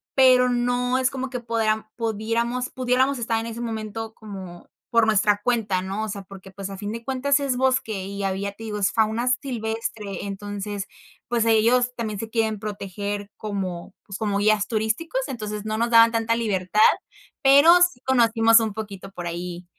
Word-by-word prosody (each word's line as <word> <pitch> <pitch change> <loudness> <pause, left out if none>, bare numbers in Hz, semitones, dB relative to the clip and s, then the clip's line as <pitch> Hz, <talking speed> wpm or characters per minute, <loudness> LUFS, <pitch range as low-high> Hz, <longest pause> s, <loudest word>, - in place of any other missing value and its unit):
pero 255 -1 +6
no 245 +1 +1
es 255 - +2
como 265 0 -4
que 250 -1 -4
podeam 220 -2 0
podiéramos- 230 +2 -1
pudiéramos 255 +1 +1
estar 230 -1 0
en 225 - -5
ese 230 +1 -6
momento 220 -1 -5
como 190 -5 -10 0.2
por 230 -2 +4
nuestra 210 -1 +3
cuenta, 215 -6 +1
¿no? 195 +3 -3
O 220 - -4
sea, 200 -1 -5
porque, 190 0 -12
pues, 195 0 -7
a 195 - -7
fin 205 +1 -5
de 230 0 -6
cuentas, 275 +2 +1
es 275 -3 -1
bosque 250 -7 0
y 200 0 -5
había, 195 +1 -2
te 225 - -12
digo, 210 -1 -4
es 200 - +2
fauna 225 +2 +1
silvestre, 220 -5 -4
entonces, 205 0 -5 0.4
pues, 235 -1 +1
ahí 225 -1 +4
ellos 245 +3 +3
también 215 -4 -4
se 225 - -5
quieren 220 -2 0
proteger 205 0 -5
como, 190 -5 -5
pues, 200 -2 -7
como 205 -2 0
guías 210 0 +2
turísticos, 225 - -1
entonces 210 -4 -5
no 215 0 -2
nos 235 +1 0
daban 230 0 +7
tanta 230 0 +1
libertad, 210 -3 0 0.6
pero 280 +5 +8
sí 355 -8 +3
conocimos 230 -3 +4
un 220 -2 -2
poquito 200 -3 -7
por 175 -2 -6
ahí, 175 +1 -5
220 Hz, 180 wpm, -24 LUFS, 200-240 Hz, 0.6 s, pero